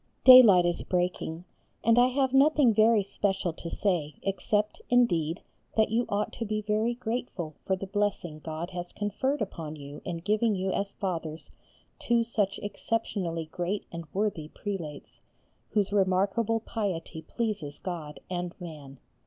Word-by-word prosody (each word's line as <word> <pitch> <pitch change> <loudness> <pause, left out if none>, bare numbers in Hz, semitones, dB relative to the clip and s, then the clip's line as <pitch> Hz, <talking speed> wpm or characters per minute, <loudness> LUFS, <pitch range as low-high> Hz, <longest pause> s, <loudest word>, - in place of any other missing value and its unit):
Daylight 230 -9 +9
is 175 -1 0
breaking, 180 -2 -2 0.4
and 230 +1 +5
I 245 - +6
have 260 0 +1
nothing 275 -3 +5
very 220 0 +5
special 190 -3 -1
to 170 - -7
say 165 -7 -1
except, 205 +2 -1
indeed, 175 -10 +2 0.3
that 220 -1 +3
you 235 +2 +1
ought 205 +1 -1
to - - -4
be 215 0 -1
very 215 +3 +1
grateful 225 -9 -4
for 190 - +2
the 190 - -6
blessing 195 -5 -2
God 160 +3 -5
has 175 -1 -6
conferred 225 +6 -1
upon 160 -6 -6
you 145 0 -9
in 175 -2 -3
giving 210 +5 +1
you 190 0 -1
as 200 +1 -2
fathers 165 -4 -4 0.5
two 235 -1 +2
such 210 -4 -1
exceptionally 200 -6 -2
great 180 +3 -2
and 170 -1 -6
worthy 195 -6 -1
prelates, 165 -5 -6 0.5
whose 205 -2 0
remarkable 200 +4 +2
piety 185 -8 -3
pleases 200 -10 -3
God 165 -5 -6
and 180 0 -4
man. 150 -6 -9
195 Hz, 145 wpm, -28 LUFS, 170-220 Hz, 0.5 s, Daylight